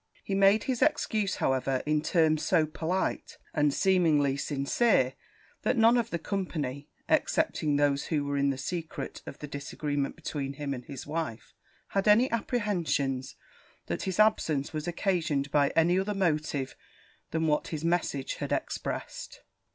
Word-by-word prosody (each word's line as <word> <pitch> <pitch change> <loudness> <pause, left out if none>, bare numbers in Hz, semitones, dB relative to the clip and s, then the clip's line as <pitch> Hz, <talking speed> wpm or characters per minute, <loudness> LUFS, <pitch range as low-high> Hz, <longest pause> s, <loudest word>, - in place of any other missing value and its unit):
He 195 - -4
made 195 +2 +5
his 255 -3 -2
excuse, 220 -9 +1
however, 130 0 0
in 150 0 +2
terms 155 -1 +2
so 160 - +3
polite, 165 +4 -2 0.2
and 150 -1 +3
seemingly 155 -6 +3
sincere, 140 - +1 0.5
that 255 - +1
none 230 +1 +6
of 235 -3 +1
the 170 - -1
company, 155 -7 -3 0.2
excepting 150 -2 +1
those 140 -1 +2
who 150 -3 0
were 140 0 -2
in 140 0 +2
the 135 - -1
secret 155 -1 -5
of 135 - -7
the 150 - -7
disagreement 145 0 -3
between 145 -4 -4
him 140 0 -3
and 125 -2 -7
his 135 -3 -8
wife, 155 -7 -4 0.4
had 195 +1 0
any 230 +5 +5
apprehensions 175 - -1 0.5
that - - -3
his 190 0 -3
absence 160 -10 +2
was 155 +2 -4
occasioned 165 -6 0
by 145 -1 +4
any 175 +3 +4
other 205 +2 -1
motive 155 -7 0 0.5
that 160 - -1
what 155 -2 +1
his 155 0 -4
message 165 -5 -1
had - - -4
expressed. - - -4
155 Hz, 150 wpm, -29 LUFS, 140-190 Hz, 0.5 s, none